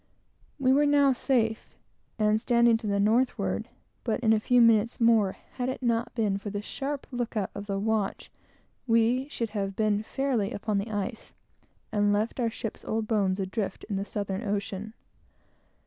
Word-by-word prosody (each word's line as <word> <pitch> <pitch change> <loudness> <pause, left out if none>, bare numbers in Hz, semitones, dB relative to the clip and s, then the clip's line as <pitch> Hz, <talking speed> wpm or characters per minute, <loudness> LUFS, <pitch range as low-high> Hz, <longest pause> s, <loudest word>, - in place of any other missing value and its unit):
We 260 -2 +3
were 290 +2 +4
now 285 -1 +5
safe, 230 -3 0 0.4
and 215 0 +2
standing 235 -1 +4
to 225 -1 -6
the 200 0 +1
northward; 230 +5 +1 0.3
but, 225 -3 0
in 220 -2 +4
a 220 - +3
few 245 +3 +3
minutes 230 -1 +4
more, 225 -5 +4 0.2
had 250 0 -1
it 260 - -5
not 235 0 0
been 210 -4 0
for 205 - -6
the 205 0 -3
sharp 280 +4 -4
look 245 -2 -3
out 200 -3 -1
of 200 +1 -7
the 200 -1 -1
watch, 210 0 -1 0.6
we 230 +3 +3
should 230 -6 -3
have 195 -2 -3
been 210 -1 +1
fairly 245 -3 -1
upon 205 0 -1
the 205 +3 -4
ice, 205 +2 -4 0.6
and 205 -1 +2
left 215 +5 0
our 235 -2 +1
ship's 225 0 -6
old 220 0 -2
bones 200 -4 +1
adrift 195 +2 -3
in 205 - -1
the 195 - -1
Southern 200 -1 -3
ocean. 205 0 -3
220 Hz, 175 wpm, -28 LUFS, 205-240 Hz, 0.6 s, now